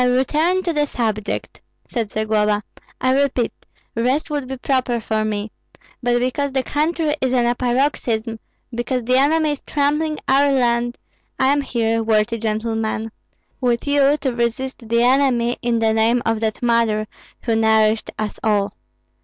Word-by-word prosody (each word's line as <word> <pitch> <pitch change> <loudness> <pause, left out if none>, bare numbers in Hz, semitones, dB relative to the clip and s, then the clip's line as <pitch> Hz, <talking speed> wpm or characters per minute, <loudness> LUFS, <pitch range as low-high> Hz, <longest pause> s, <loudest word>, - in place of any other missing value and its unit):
"I - - +4
return 305 +9 +2
to 340 - -1
the 295 -1 +1
subject," 220 -6 -3 0.3
said 230 -4 -2
Zagloba. 215 -1 +1 0.4
"I 260 +2 +3
repeat, 260 -4 0 0.4
rest 255 +7 0
would 290 -3 -2
be 265 0 -5
proper 255 -2 0
for 220 -1 -1
me; 210 0 -3 0.5
but 240 -1 +2
because 260 +3 -1
the 265 -1 +1
country 310 +2 0
is 260 -1 +1
in 245 -2 +2
a 240 - +2
paroxysm, 240 -3 -1 0.3
because 240 +1 -2
the 250 +2 +2
enemy 305 +3 +3
is 290 - -4
trampling 300 +2 0
our 280 +1 +4
land, 240 -2 +1 0.4
I 265 - +3
am 290 0 +2
here, 230 -4 0
worthy 225 +1 +1
gentlemen, 220 0 -2 0.5
with 240 -2 0
you 285 0 +3
to 265 -3 0
resist 235 0 -3
the 235 +1 +3
enemy 250 -2 +3
in 235 -1 +1
the 225 -1 +2
name 230 +2 +2
of 225 -1 +1
that 220 +1 -2
mother 230 -3 +2 0.4
who 230 -2 +1
nourished 220 0 +3
us 215 -1 -4
all. 205 -2 +1
240 Hz, 160 wpm, -20 LUFS, 225-270 Hz, 0.5 s, I